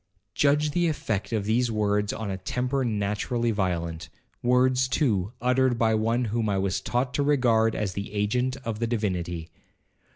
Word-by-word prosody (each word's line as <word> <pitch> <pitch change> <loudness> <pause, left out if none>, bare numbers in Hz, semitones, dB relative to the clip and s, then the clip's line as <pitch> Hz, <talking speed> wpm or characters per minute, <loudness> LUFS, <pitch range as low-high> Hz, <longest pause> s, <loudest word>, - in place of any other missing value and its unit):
Judge 150 +1 +2
the 175 +3 +1
effect 115 -11 -2
of 110 -3 -1
these 120 +3 +2
words 105 -1 0
on 110 -3 -4
a 95 - -3
temper 125 +7 -1
naturally 110 +2 -1
violent,—words, 105 +8 0
too, 110 - +1
uttered 125 0 +2
by 115 -1 +2
one 115 +3 +1
whom 110 0 -1
I 100 - +1
was 95 -1 -1
taught 125 +1 -1
to - - 0
regard 120 -6 +3
as 100 -3 -2
the 100 +1 -5
agent 125 +5 0
of 110 -2 -3
the 115 - 0
Divinity. 90 -7 -2
115 Hz, 160 wpm, -26 LUFS, 100-125 Hz, -, regard